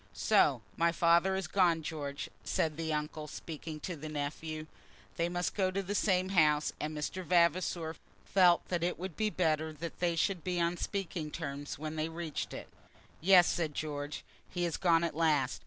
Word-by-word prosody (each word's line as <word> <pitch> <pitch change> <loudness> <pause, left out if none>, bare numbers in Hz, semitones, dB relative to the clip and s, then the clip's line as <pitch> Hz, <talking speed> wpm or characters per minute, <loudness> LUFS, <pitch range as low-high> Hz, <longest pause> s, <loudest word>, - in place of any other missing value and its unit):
"So 135 - +3
my 170 0 +3
father 170 +3 +4
has 190 -1 -2
gone, 170 -2 +2
George," 145 -3 -4 0.2
said 155 -2 0
the 160 0 -3
uncle, 150 0 -3
speaking 155 0 -7
to 180 - -4
the 155 0 -7
nephew. 155 +1 -4 0.5
They 170 +1 0
must 175 0 -1
go 190 -2 +1
to 195 +1 -2
the 195 +2 -3
same 185 -3 +2
house, 150 -5 +3
and 155 0 -3
Mr. 180 +5 -3
Vavasor 170 -1 +2 0.3
felt 180 -3 +4
that 175 -2 0
it 175 +1 0
would 180 -2 -6
be 215 -1 +1
better 160 -5 0
that 165 +2 -7
they 175 -1 +1
should 175 +1 0
be 180 -2 -1
on 170 +1 +1
speaking 175 -5 -3
terms 145 -2 -5
when 155 +1 -5
they 155 +1 -1
reached 165 -2 -4
it. - - -7 0.5
"Yes," 180 0 +7
said 160 -5 -1
George; 145 -1 -4 0.3
"he 175 - -2
has 170 -2 0
gone 170 -2 +3
at 170 -3 -1
last. 150 -5 +2
165 Hz, 185 wpm, -32 LUFS, 155-180 Hz, 0.5 s, Yes